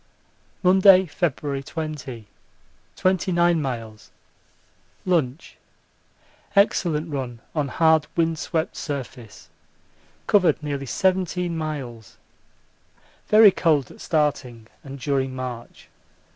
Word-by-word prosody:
Monday, 190 +1 +6
February 145 -4 -2
20. 140 -7 -6 0.7
29 175 -2 +1
miles. 115 -6 -6 1.0
Lunch. 165 -5 -1 1.0
Excellent 170 -6 +2
run 125 -4 -4
on 150 -3 -1
hard 160 +2 +3
wind 165 -1 0
swept 160 -1 -2
surface 125 -6 -7 0.8
covered 185 -6 +3
nearly 140 -2 -4
seventeen 180 0 0
miles. 135 -9 -6 1.1
Very 215 -1 +7
cold 155 -7 +1
at - - -15
starting 135 -7 -1 0.2
and 140 0 -9
during 135 -1 -1
march. 125 -2 -7
150 Hz, 90 wpm, -23 LUFS, 130-175 Hz, 1.1 s, Very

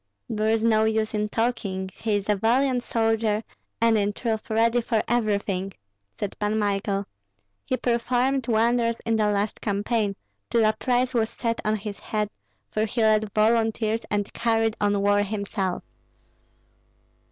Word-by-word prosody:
"There 215 0 0
is 225 0 +2
no 220 -1 +4
use 220 0 0
in 210 0 -1
talking, 200 -5 -2
he 220 -2 -1
is 205 -1 -2
a 210 - +3
valiant 245 +5 +2
soldier, 225 -2 0 0.4
and 225 -1 +4
in 205 0 0
truth 220 0 -3
ready 230 +2 +3
for 225 -2 0
everything," 200 -4 0 0.5
said 205 -2 -3
Pan 210 +1 0
Michael. 200 -1 0 0.6
"He 255 - 0
performed 250 +2 0
wonders 230 0 +2
in 225 0 0
the 215 -1 +2
last 205 +1 -1
campaign, 205 0 0 0.3
till 230 -2 +3
a 215 - +4
price 250 +2 0
was 225 -2 +1
set 230 -1 -2
on 215 0 +1
his 210 -1 -6
head, 210 -1 -2 0.4
for 215 0 +1
he 225 +2 -2
led 215 -1 +3
volunteers 225 0 +2
and 205 -1 -1
carried 225 -1 +1
on 205 -1 +2
war 205 0 +3
himself." 200 -2 -2
220 Hz, 155 wpm, -25 LUFS, 205-230 Hz, 0.6 s, no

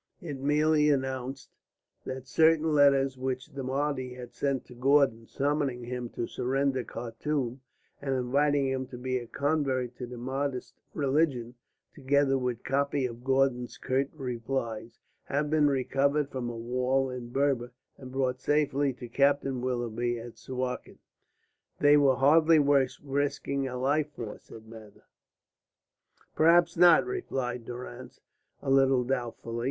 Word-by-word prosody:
It 150 -8 -6
merely 150 +2 +3
announced 130 -1 -2 0.5
that 130 0 -6
certain 160 +3 +3
letters 135 -2 +4
which 130 -1 -3
the 140 - -5
Mahdi 130 -1 -2
had 125 -1 -10
sent 135 +1 -1
to - - -13
Gordon 130 -3 +2
summoning 140 -3 -1
him 125 0 -5
to 120 - -2
surrender 135 +2 -1
Khartum, 125 +2 -4 0.4
and 135 -1 -1
inviting 140 +3 +2
him 130 -1 -2
to 125 - -9
become 130 0 -2
a - - -13
convert 135 -3 -1
to 125 - -6
the 125 0 -8
Mahdist 130 +1 -3 0.2
religion, 135 -4 0 0.4
together 140 0 +2
with 125 -3 -2
copies 140 -1 0
of 115 +1 -13
Gordon's 130 -2 +1
curt 135 +2 0
replies, 120 -3 -4 0.3
had 145 +1 -1
been 155 -2 +4
recovered 140 +2 +1
from 125 -2 -3
a 120 - -6
wall 125 +3 0
in 125 -2 -7
Berber 130 -2 0 0.3
and 130 -1 -10
brought 130 -1 -1
safely 145 -2 +1
to 125 0 -9
Captain 135 0 +1
Willoughby 120 -1 -1
at 115 0 -10
Suakin. 125 -1 -4 0.8
"They 145 0 +6
were 140 -3 +5
hardly 155 +5 +5
worth 140 -2 +3
risking 140 -1 -1
a 125 -1 -5
life 145 +4 0
for," 110 -3 -6
said 110 -1 -13
Mather. 110 -2 -13 1.3
"Perhaps 170 +2 +4
not," 175 -1 +6
replied 130 - -3
Durrance, 120 - -8 0.4
a 135 - -1
little 135 -2 +4
doubtfully. 120 -2 -3
135 Hz, 140 wpm, -29 LUFS, 125-145 Hz, 1.3 s, They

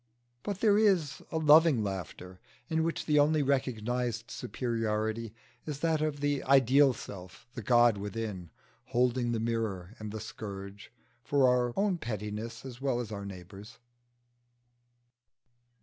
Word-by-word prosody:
But 195 +6 -4
there 210 -2 +5
is 180 -10 +2
a 160 - -1
loving 155 -5 +6
laughter 90 -1 -6 0.3
in 160 0 +1
which 165 0 -2
the 150 -1 +3
only 150 +1 +3
recognised 125 -3 -1
superiority 115 -2 -2 0.4
is 145 -2 -5
that 160 -2 +1
of 150 -2 -2
the 145 -1 0
ideal 135 +1 +5
self, 95 -4 -10
the 120 - -6
God 120 -1 +4
within, 105 -4 -5 0.4
holding 125 0 +1
the 115 - -1
mirror 110 -5 -2
and 105 -1 -6
the 110 - -5
scourge 100 -2 -8 0.3
for 140 0 +3
our 125 -1 +2
own 195 -3 +1
pettiness 110 +1 -5
as 125 -1 -9
well 135 -3 0
as 115 -3 -5
our 100 -1 -5
neighbours'. 100 +6 -11
120 Hz, 135 wpm, -30 LUFS, 105-140 Hz, 0.4 s, loving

